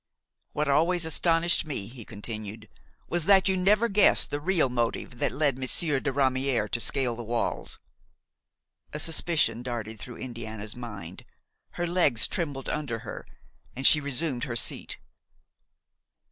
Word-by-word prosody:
"What 150 0 -1
always 165 +5 +2
astonished 165 +2 +2
me," 145 -10 -4
he 115 +1 -10
continued, 110 0 -7 0.4
"was 175 -2 -1
that 195 0 +5
you 190 - +2
never 205 +5 +3
guessed 205 -1 +4
the 145 - -1
real 170 -1 +2
motive 120 0 -2
that - - +1
led 140 -4 +1
Monsieur 135 +2 0
de 135 - -2
Ramière 130 -4 +1
to 120 - 0
scale 125 -1 +1
the 120 - -6
walls." 115 0 -2 1.2
A - - -3
suspicion 155 -7 +1
darted 115 -3 -5
through 125 - -8
Indiana's 110 -4 -6
mind; 105 -8 -8 0.5
her 175 - -2
legs 170 -9 +2
trembled 145 -8 -3
under 145 -7 -2
her, - - -7 0.5
and 135 +2 -2
she 150 - +8
resumed 140 -2 -2
her 120 - -4
seat. - - 0
135 Hz, 145 wpm, -27 LUFS, 120-165 Hz, 1.2 s, she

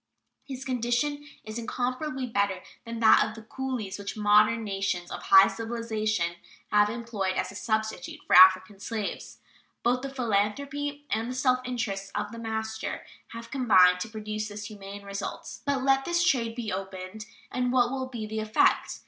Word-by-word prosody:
His 265 -1 -6
condition 255 +4 -1 0.2
is 215 +2 -6
incomparably 255 +4 -2
better 200 -5 -1 0.2
than 230 0 -6
that 220 - +7
of 215 0 -5
the 225 - -10
coolies 235 -5 -4
which 200 +2 -6
modern 210 +2 +4
nations 195 -4 -2
of - - -5
high 195 0 +7
civilization 215 -6 -2 0.3
have 210 0 +4
employed 220 -5 -2
as - - -2
a - - -12
substitute 220 -4 -2
for - - +3
African 185 +2 +7
slaves. 215 -1 -5 0.5
Both 245 +1 +2
the 275 - -4
philanthropy 275 +5 -1
and 225 +3 -1
the 255 - -4
self 255 -1 +2
interest 200 -6 -3
of - - -2
the 230 - -8
master 220 -1 -4 0.3
have 230 0 -9
combined 185 -9 +5
to 200 - -4
produce 215 -1 -4
this 205 0 -7
humane 200 -1 -9
result. 200 0 -6
But 275 -2 +1
let 270 0 +3
this 345 0 +1
trade 230 -8 +1
be 230 -4 -4
reopened 190 +2 -6 0.2
and 250 -1 0
what 245 -1 +3
will 260 -1 -3
be 235 -4 -5
the 220 +1 -4
effect? 215 0 +2
220 Hz, 165 wpm, -27 LUFS, 205-250 Hz, 0.5 s, that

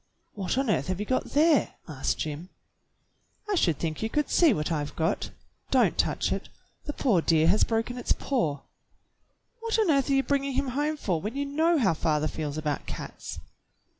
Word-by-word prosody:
"What 200 +3 -2
on 270 -4 +2
earth 135 -7 0
have 185 0 -2
you 210 - -2
got 255 +4 0
there.^" 305 0 +3
asked 140 -4 -2
Jim. 155 +4 -5 1.0
"I 415 - -1
should 170 - +2
think 155 -2 -3
you 220 - -1
could 300 +5 -1
see 335 -4 +5
what 155 -6 -1
I've 150 -2 -2
got. 165 0 -1 0.4
Don't - - +3
touch - - 0
it; - - -3 0.4
the 295 - -3
poor 220 - +2
dear 160 -1 +3
has 205 +4 +4
broken 230 +2 -1
its - - -3
paw." 160 - 0 1.0
"What 455 0 -1
on 425 -7 +3
earth 275 -1 +2
are - - +3
you 270 0 +3
bringing 275 -1 0
him 270 +1 0
home 295 +4 -1
for 180 - -1
when 215 +6 -4
you 285 0 -1
know 320 +4 +2
how 210 - +3
father 155 -1 0
feels 150 -2 -4
about 150 -2 -3
cats?" - - -7
225 Hz, 195 wpm, -27 LUFS, -, 1.0 s, see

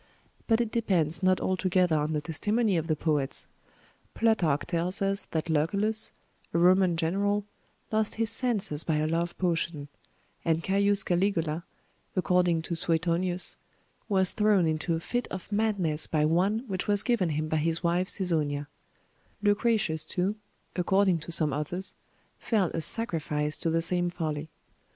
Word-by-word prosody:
But 225 -1 +3
it 235 -2 -1
depends 185 -9 +1
not 185 0 +3
altogether 185 -2 +1
on 150 +1 0
the 150 - -1
testimony 205 +7 0
of 165 -1 -1
the 155 - +1
poets: 150 -3 0 0.7
Plutarch 180 -11 +2
tells 175 +2 -1
us, 195 0 0
that 160 0 -3
Lucullus, 200 +8 +1 0.4
a - - +4
Roman 180 0 +4
General, 200 +5 0 0.5
lost 215 -1 +1
his 225 -1 0
senses 215 - 0
by 160 - 0
a 150 0 +1
love 170 +2 -1
potion; 165 -5 -1 0.5
and 165 0 0
Caius 200 +1 +3
Caligula, 175 -3 0 0.5
according 180 -3 +2
to 170 - -3
Suetonius, 175 +2 0 0.5
was 190 -2 +2
thrown 210 -4 +3
into 160 +1 0
a - - -2
fit 245 +8 -3
of 190 +2 -7
madness 200 -8 +1
by 150 -1 +1
one 190 +8 +1
which 190 -3 -3
was 205 -1 +3
given 235 -9 +1
him 155 0 -2
by 155 - 0
his 165 +2 -1
wife 175 +2 +1
Cæsonia; 155 -7 0 0.8
Lucretius 205 -6 +2
too, 185 +5 -2 0.4
according 190 0 +2
to 165 - -8
some 155 -3 +1
authors, 175 +7 -1 0.5
fell 205 -7 0
a 165 - -2
sacrifice 155 -7 -1
to 165 - 0
the 165 0 +1
same 175 +1 +2
folly. 155 -3 -4
175 Hz, 150 wpm, -28 LUFS, 160-200 Hz, 0.8 s, a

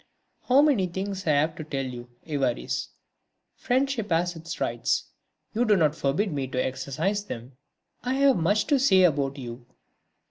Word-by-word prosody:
"How 265 +3 +6
many 255 -12 +3
things 190 +1 -4
I 155 - +4
have 155 +2 +2
to 155 - -5
tell 135 -3 -3
you, 120 -1 -7 0.2
Évariste. 135 -6 -1 0.7
Friendship 260 -4 0
has 175 +1 +1
its 165 +1 -7
rights; - - -1 0.4
you 230 +2 +2
do 215 -3 +4
not 155 -5 +3
forbid 160 +7 0
me 135 -2 -2
to 130 - -6
exercise 140 +10 -2
them? 120 - -7 0.5
I 255 +1 -1
have 275 -1 +4
much 200 +5 +2
to 285 -3 +2
say 190 -8 +5
about 140 -5 +2
you 120 -2 -7
170 Hz, 165 wpm, -26 LUFS, 140-210 Hz, 0.7 s, How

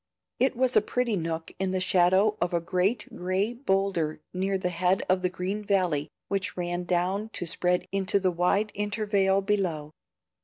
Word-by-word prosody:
It 260 +1 +2
was 255 +1 +2
a - - +7
pretty 240 +1 0
nook 165 -2 -3
in 190 -1 -1
the 185 - +1
shadow 185 +3 +3
of 175 0 0
a - - +2
great 185 +6 0
gray 185 +5 -1
bowlder 195 - 0
near 190 +1 0
the 180 -1 -1
head 180 +2 +1
of 185 0 +2
the 180 - +1
green 185 +3 -3
valley 180 -8 +1 0.2
which 195 -2 -2
ran 175 0 -2
down 185 +5 0
to 175 - -3
spread 180 +2 0
into 195 0 +2
the 185 -1 +1
wide 180 +5 +1
intervale 205 -2 +1
below. 180 -7 -1
190 Hz, 170 wpm, -27 LUFS, 180-200 Hz, 0.2 s, a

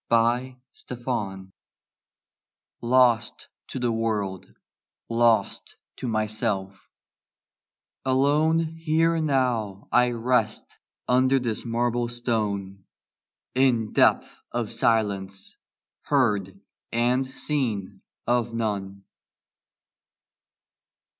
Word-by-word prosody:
ON 120 +3 +2 0.3
HIMSELF 115 -6 -4 1.4
Lost 120 -2 +2 0.2
to - - -6
the 120 -2 0
world; 105 -4 -2 0.6
lost 115 -3 +2 0.2
to 130 - -4
myself; 110 -3 -1 1.1
alone 145 +5 +3
Here 165 0 +1
now 125 -9 0
I 125 0 +4
rest 115 -2 -1 0.3
under 130 +2 +4
this 120 -3 -1
marble 120 +1 0
stone, 105 -5 -2 0.7
In 125 -4 +2
depth - - +3
of 120 -3 -2
silence, 100 -4 0 0.5
heard 105 -9 0 0.3
and 120 +3 +2
seen 130 -7 -2 0.2
of 120 -1 0
none. 100 -3 -3
115 Hz, 75 wpm, -25 LUFS, 105-130 Hz, 1.4 s, I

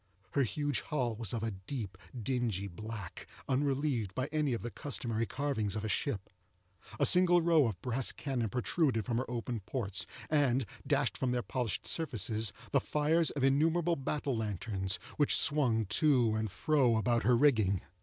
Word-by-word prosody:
Her 140 - +1
huge 145 +2 -1
hull 125 -7 -2
was 110 -3 -1
of 115 -2 -3
a 115 - -1
deep 100 +1 -6 0.2
dingy 115 -5 -1
black, 105 0 -8 0.2
unrelieved 135 -6 0
by 130 +3 -2
any 150 -4 +1
of 115 - -3
the 120 - -4
customary 115 -2 -3
carvings 130 -5 -1
of 110 0 -3
a - - -1
ship. 105 -2 -2 0.7
A - - +4
single 180 -1 +6
row 160 -5 +4
of 100 -6 -4
brass 125 +1 -1
cannon 125 -6 -2
protruded 125 - 0
from 120 -2 0
her 130 - -4
open 120 -1 -3
ports, 100 -1 -1 0.2
and 135 -5 +2 0.2
dashed - - +1
from 130 - 0
their 120 -1 -1
polished 120 -5 -2
surfaces 110 - 0 0.2
the - - +4
fires 155 +2 +2
of 140 - -3
innumerable 160 +5 +3
battle 140 -1 -2
lanterns, 100 -2 -1 0.2
which 145 - +4
swung 130 -7 +3
to 125 - +3
and 110 0 -1
fro 130 - +2
about 115 +1 +1
her 120 0 +4
rigging. 110 - +3
125 Hz, 165 wpm, -32 LUFS, 110-145 Hz, 0.7 s, single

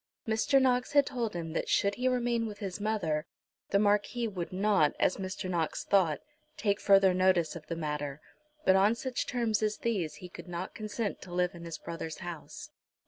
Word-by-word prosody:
Mr. 225 +5 +3
Knox 255 0 +2
had 285 -1 +6
told 235 -7 -3
him 165 -2 -4
that - - -2
should 200 0 +3
he 250 +4 -1
remain 240 -2 +1
with 210 -1 -7
his 195 -1 -5
mother 170 -8 -1 0.4
the - - +3
Marquis 210 +3 +2
would 185 -5 -5
not, 190 -5 +3
as - - +2
Mr. 190 -1 -4
Knox 170 -4 -1
thought, 180 -7 +2 0.4
take 200 -1 +1
further 195 -2 +5
notice 185 -3 +2
of 155 -2 -9
the 165 - -3
matter; 150 -3 -3 0.5
but 190 - +6
on 200 +4 +4
such 255 +1 -3
terms 230 -4 0
as 215 0 0
these 195 -9 -1
he 180 - -9
could 180 - -11
not 175 +1 -5
consent 215 0 -3
to 180 - -10
live 180 0 +1
in 170 -1 -9
his 165 -1 -5
brother's 165 -1 -6
house. 175 -3 -8
195 Hz, 195 wpm, -30 LUFS, 170-220 Hz, 0.5 s, had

